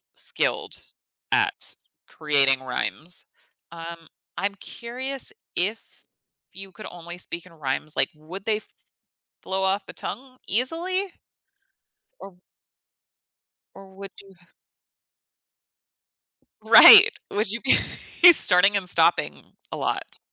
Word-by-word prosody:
skilled - - -2 0.5
at - - +1 0.3
creating 140 -4 +1
rhymes. 155 +6 -3 0.5
Um, 165 0 -10 0.3
I'm 200 0 -3
curious 260 - -5 0.2
if 210 +5 -1 0.7
you 195 0 -11
could 215 - -12
only 175 0 -11
speak 170 -1 -6
in 185 - -18
rhymes, 150 0 -4
like, - - +1
would 170 +6 -11
they 220 -1 0
f 215 - -14 0.8
flow 190 0 -3
off 195 +1 -1
the - - -10
tongue 255 0 -8
easily 335 - -1 1.2
or 195 -2 -12 1.4
or 195 -1 -16
would 195 0 -10
you 195 -1 -20 2.3
Right. 425 +1 +9 0.2
Would 205 0 -2
you 230 +1 -5
be 270 - +3 0.5
he's 345 -2 +9
starting 190 +3 +5
and 190 -3 -1
stopping - - +1 0.3
a - - -6
lot. - - -4
195 Hz, 110 wpm, -23 LUFS, 170-235 Hz, 2.3 s, Right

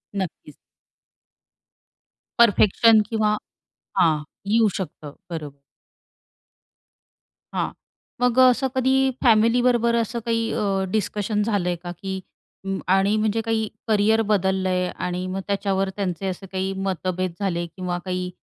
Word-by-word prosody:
नक्कीच. 180 -6 -5 1.8
परफेक्शन 225 0 +5
किंवा 215 -2 +1 0.6
हां. 155 -3 +3 0.2
येऊ 220 +1 +4
शकतं, 155 -6 -7 0.2
बरोबर. 150 -4 -7 1.9
हां, - - -1 0.5
मग 250 0 +3
अ, 255 - +8
असं 265 +2 0
कधी 260 0 +2 0.3
फॅमिलीबरोबर 235 +1 +4
असं 235 +1 -1
काही 230 -1 0
अ, 195 -2 0
डिस्कशन 210 0 -1
झालंय 195 -5 0
का 175 - -5
की 190 -1 -3 0.5
अं, 195 0 -2
आणि 195 +3 +3
म्हणजे 215 +1 +1
काही 225 -1 -1 0.2
करिअर 220 +1 +3
बदललंय 190 -2 +1
आणि 180 0 -3
मग 190 +1 -3
त्याच्यावर 195 -1 0
त्यांचे 195 -2 -2
असे 190 +1 -5
काही 190 0 -2
मतभेद 185 -1 -2
झाले 175 -4 -1
किंवा 180 +1 -4
काही 180 -1 -2
195 Hz, 115 wpm, -23 LUFS, 185-225 Hz, 1.9 s, अ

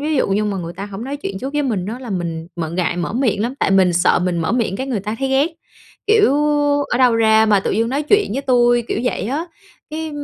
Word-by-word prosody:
ví 305 +1 -1
dụ - - +1
như 200 +2 +1
mà 205 -2 -2
người 170 -2 -5
ta 195 +3 -7
hổng 200 +2 -7
nói 275 +2 -4
chuyện 200 -9 -5
trước 265 +6 -5
với 295 0 0
mình 210 -9 -2
á 225 +4 -5
là 255 -3 -8
mình 170 -3 -3
m 170 - -2
ngại 175 -1 -1
mở 175 +3 -3
miệng 235 -5 0
lắm, 240 +4 -2
tại - - +2
mình 190 -2 +4
sợ 175 +1 +3
mình 180 -1 -1
mở 160 -1 -1
miệng 230 -6 0
cái 265 - -4
người 245 -7 -2
ta 210 +2 -4
thấy 270 - -1
ghét, 270 +2 +3 0.6
kiểu: 425 - +4 0.5
"Ở - - 0
đâu 250 -3 +4
ra 220 -1 +4
mà 205 -2 +4
tự - - -2
dưng 225 +3 0
nói 275 +4 -1
chuyện 405 - +2
với 270 +4 -2
tui?" 240 -2 +3
kiểu - - -1
vậy 250 - -1
á, 290 +6 -2 0.5
cái 315 +1 -4
225 Hz, 270 wpm, -19 LUFS, 195-265 Hz, 0.6 s, mình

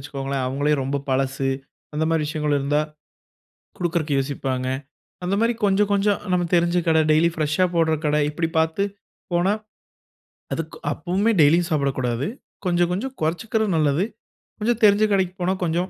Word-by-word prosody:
வச்சுக்கோங்களே, 135 0 -4
அவங்களே 145 +3 0
ரொம்ப 135 +2 -1
பழசு 135 0 0 0.5
அந்த 155 +1 0
மாரி 160 -2 +2
விஷயங்கள் 150 -1 -1
இருந்தா 145 +2 +1 1.0
குடுக்றதுக்கு 165 -4 0
யோசிப்பாங்க. 135 -2 -2 0.6
அந்த 190 +3 0
மாரி 230 +1 +3
கொஞ்சம், 200 +1 +2
கொஞ்சம் 200 0 +2
நமக்கு 175 -1 0
தெரிஞ்ச 170 +1 +2
கடை 160 -1 +5
,டெய்லி 160 +2 +4
ஃபிரெஸ்ஷா 155 +3 +1
போட்ற 165 -1 +3
கடை 150 0 +2
இப்படி 160 +2 -1
பார்த்து 160 +5 +2 0.5
போனா, 175 +3 +2 1.0
அதுக்கு 160 -1 -5 0.2
அப்பவுமே 185 +9 0
டெய்லியும் 165 +4 +4
சாப்பிடக்கூடாது. 135 -3 0 0.4
கொஞ்சம், 175 -1 +2
கொஞ்சம் 255 +9 -3
கொறச்சுக்கறது 215 +7 0
நல்லது. 155 +4 +2 0.5
கொஞ்சம் 235 +2 0
தெரிஞ்ச 205 0 +6
கடைக்கு 185 -2 +1
போனா 180 +2 +2
கொஞ்சம் 175 +2 0
165 Hz, 140 wpm, -23 LUFS, 145-185 Hz, 1.0 s, தெரிஞ்ச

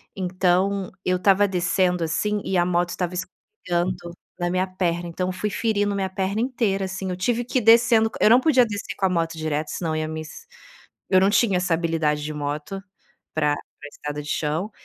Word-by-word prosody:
Então, 185 +1 +1 0.2
eu 185 0 +1
tava 200 +1 +5
descendo, 180 -1 +1
assim, 210 +6 -1
e 190 - 0
a 175 - +3
moto 175 0 +1
estava 180 -1 -3
escorregando 180 - -3 0.4
na 175 0 0
minha 185 +1 +1
perna, 175 -2 -2
então 180 +2 -2
eu 185 - -3
fui 210 +3 -2
ferindo 205 -2 0
a - - -3
minha 190 -1 -1
perna 195 +2 -2
inteira, 225 -6 0
assim, 190 0 -4
eu 180 - -3
tive 235 +6 0
que 250 - -1
ir - - -3
descendo 225 0 +5
co - - -9
eu - - +6
não 240 +3 +7
podia 260 -4 +4
descer 205 -3 -5
com 195 - +1
a 190 - +3
moto 165 -2 0
direto, 155 -1 -2
senão 165 -3 -3
eu - - -1
ia 155 - -2
mis 155 0 -6 0.8
eu 185 - +5
não 190 +1 +4
tinha 205 -2 +3
essa 180 -1 0
habilidade 160 -3 0
de 155 0 -4
moto 150 +6 -4 0.5
pra 150 -2 +2 0.2
pra 145 - -10
estrada 150 0 -6
de 150 - -8
chão. 160 +9 -1
185 Hz, 210 wpm, -23 LUFS, 165-200 Hz, 0.8 s, não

